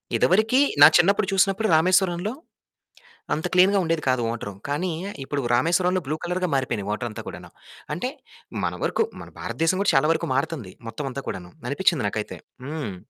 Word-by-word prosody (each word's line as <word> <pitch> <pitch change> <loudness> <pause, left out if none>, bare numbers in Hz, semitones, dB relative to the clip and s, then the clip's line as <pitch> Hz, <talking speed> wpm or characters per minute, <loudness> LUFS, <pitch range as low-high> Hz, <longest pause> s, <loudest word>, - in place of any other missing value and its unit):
ఇదివరికి 220 +8 +3 0.2
నా - - +12
చిన్నప్పుడు 195 +3 +3
చూసినప్పుడు 195 +3 +2
రామేశ్వరంలో 185 +4 +2 1.0
అంత 160 +3 -1
క్లీన్‌గా 190 +2 +5
ఉండేది 165 -1 0
కాదు 130 -1 +2
వాటరు. 115 -3 -4
కానీ 170 +6 -1 0.3
ఇప్పుడు 140 +1 -3
రామేశ్వరంలో 180 +7 +2
బ్లూ 150 +3 -2
కలరుగా 180 +1 -1
మారిపోయినాయి 115 -7 -1
వాటరంతా 110 0 -4
కూడాను. - - -9 0.4
అంటే 215 +11 -2 0.5
మన - - 0
వరకు - - +1 0.2
మన - - -10
భారతదేశం 165 +3 0
గూడా 200 - +3
చాలా 135 +3 +4
వరకు 165 - -1
మారుతుంది 135 - -2 0.2
మొత్తం 115 +6 -5
అంతా 140 +2 -5
కూడాను. 90 -1 -5 0.2
అనిపించింది 160 -2 +1
నాకైతే. 105 +1 -4 0.3
హ్మ్. 140 -9 -5
165 Hz, 150 wpm, -24 LUFS, 130-185 Hz, 1.0 s, నా